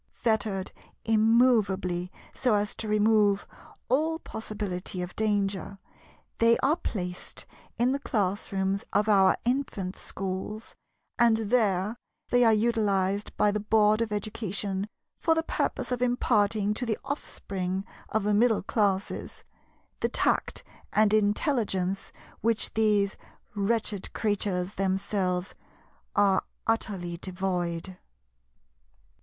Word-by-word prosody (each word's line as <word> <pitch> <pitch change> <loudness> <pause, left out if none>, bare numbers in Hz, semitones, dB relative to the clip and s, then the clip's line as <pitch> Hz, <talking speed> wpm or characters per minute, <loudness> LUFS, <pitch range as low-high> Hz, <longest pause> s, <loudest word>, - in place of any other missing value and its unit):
Fettered 215 -4 0 0.3
immovably 215 -6 +3 0.2
so 245 -5 +2
as 205 0 0
to 220 - -5
remove 210 -1 +3 0.4
all 315 +6 +1
possibility 205 - -5
of 180 - -8
danger, 200 -2 -1 0.6
they 230 0 +5
are 290 +4 +4
placed 180 - -5 0.3
in 245 +2 +3
the 275 - 0
classrooms 195 -3 -1
of 205 +2 +2
our 195 -3 +5
Infant 240 -7 -1
Schools, 195 +3 -5 0.5
and 235 -2 +5
there 215 -2 +1 0.3
they 245 0 +4
are 225 - +6
utilized 210 -3 +1
by 210 - +4
the 210 - -1
Board 215 +1 +3
of 225 -2 -1
Education 205 -1 -3 0.3
for 325 - +3
the 325 - +1
purpose - - -2
of 250 -1 -1
imparting 215 -4 +2
to 230 - -4
the 220 - 0
offspring 195 -9 -4 0.2
of 220 -1 0
the 210 0 +1
Middle 220 0 +3
Classes 200 -2 -1 0.6
the - - 0
tact - - 0 0.3
and 215 0 +4
intelligence 205 - +1 0.3
which 230 -1 +1
these 210 -2 +2 0.4
wretched 205 -1 -1
creatures 200 -3 -1
themselves 190 -1 -1 0.6
are 200 -2 +4 0.2
utterly 190 -6 -1
devoid. 180 -1 -3
205 Hz, 110 wpm, -28 LUFS, 195-225 Hz, 0.6 s, are